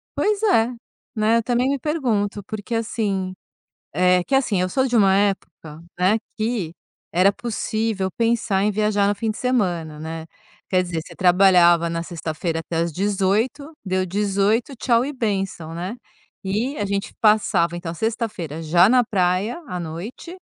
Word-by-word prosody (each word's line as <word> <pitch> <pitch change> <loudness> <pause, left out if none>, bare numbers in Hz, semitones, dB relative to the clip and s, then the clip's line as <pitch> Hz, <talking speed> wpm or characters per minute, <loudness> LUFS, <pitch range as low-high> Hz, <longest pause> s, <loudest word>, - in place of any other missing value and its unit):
Pois 420 -1 +1
é, 250 - +3 0.4
né, 220 +2 +3
eu 230 - 0
também 245 +2 +1
me 280 - +1
pergunto. 225 - -1
Porque, 215 +2 -6
assim, 205 -5 -2 0.6
eh, 180 0 +3
que, 270 - -6
assim, 225 -9 +1
eu 185 - 0
sou 265 +5 +1
de 245 - -1
uma 195 -4 +5
época, 190 -6 -2 0.2
né, 190 +4 +4 0.2
que 215 -7 -1 0.4
era 185 +3 +4
possível 220 -4 -2
pensar 230 -3 +1
em 210 - +2
viajar 205 -1 +1
no 205 - +1
fim 220 +1 -1
de - - -9
semana, 175 -11 -1
né. 160 +1 -6 0.4
Quer 185 -1 +3
dizer, 170 -2 -3
você - - -13
trabalhava 180 -2 +5
na 165 0 -3
sexta-feira 165 -1 -3
até 165 0 -4
às 165 -1 0
18h, 205 - 0
deu 185 -1 0
18h, 205 +6 0
tchau 235 0 +2
e 280 - -3
bênção, 195 - -3
né. 180 +6 -4 0.5
E 220 +9 -2
a 205 - -1
gente 200 0 -3
passava 205 -6 +3
então 170 -1 -5
sexta-feira 205 - -3
já 170 +4 +5
na 250 +1 +4
praia 195 - 0
à 180 - -4
noite, 180 - -7
200 Hz, 160 wpm, -22 LUFS, 180-230 Hz, 0.6 s, uma